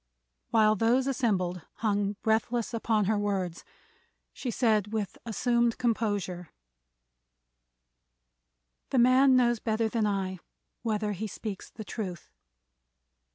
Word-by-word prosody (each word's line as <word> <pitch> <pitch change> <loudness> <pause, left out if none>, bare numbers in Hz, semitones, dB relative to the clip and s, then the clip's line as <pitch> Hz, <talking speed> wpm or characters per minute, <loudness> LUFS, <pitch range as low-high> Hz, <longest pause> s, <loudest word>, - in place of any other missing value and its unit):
While 215 -1 +4
those 235 +5 +2
assembled 195 -10 0
hung 205 -2 0
breathless 225 +2 0
upon 220 -2 +1
her 210 +1 +1
words 190 -4 -2 0.7
she 255 - -5
said 215 -4 +1
with 215 -3 -2
assumed 235 +1 +1
composure: 205 -7 -1 2.4
"The 265 - 0
man 255 +2 +6
knows 240 -2 +3
better 220 0 0
than 220 -1 0
I 190 -2 -2 0.4
whether 215 -2 -1
he 205 +2 -4
speaks 205 0 -6
the 215 - -9
truth. 185 -7 -6
220 Hz, 110 wpm, -29 LUFS, 200-235 Hz, 2.4 s, man